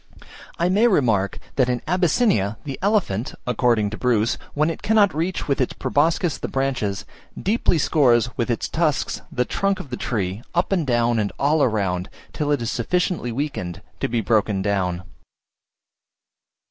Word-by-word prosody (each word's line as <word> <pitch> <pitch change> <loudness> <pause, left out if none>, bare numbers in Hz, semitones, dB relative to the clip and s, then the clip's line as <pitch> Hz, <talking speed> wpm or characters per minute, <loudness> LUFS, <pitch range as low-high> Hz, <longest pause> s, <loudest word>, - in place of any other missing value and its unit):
I 170 - +1
may 205 +6 +4
remark, 110 - +2 0.2
that 130 -2 +3
in 125 -1 0
Abyssinia 175 - +2
the 140 -2 -6
elephant, 185 - 0
according 120 -4 +1
to 110 - -6
Bruce, 115 -2 +1 0.2
when 150 +3 +2
it - - -8
cannot 210 -3 +3
reach 170 +5 -2
with 140 -2 +1
its 125 - 0
proboscis 160 +1 +1
the - - -3
branches, 125 -8 -2 0.3
deeply 205 -4 +1
scores 125 -6 +3
with 120 0 -1
its 120 - -1
tusks 155 -3 0
the 125 - 0
trunk 195 +6 0
of 135 - -9
the 125 - -3
tree, 100 -3 -2
up 175 +3 +1
and 175 -7 +1
down 120 -1 +2
and 105 -1 -1
all 145 +1 +2
round, 95 -5 -1 0.2
till 150 -1 -1
it 140 -5 +1
is 115 - -2
sufficiently 180 0 -1
weakened 120 - -4 0.2
to - - 0
be 115 -1 0
broken 105 -2 +1
down. 95 -3 -1
125 Hz, 160 wpm, -22 LUFS, 110-165 Hz, 0.3 s, may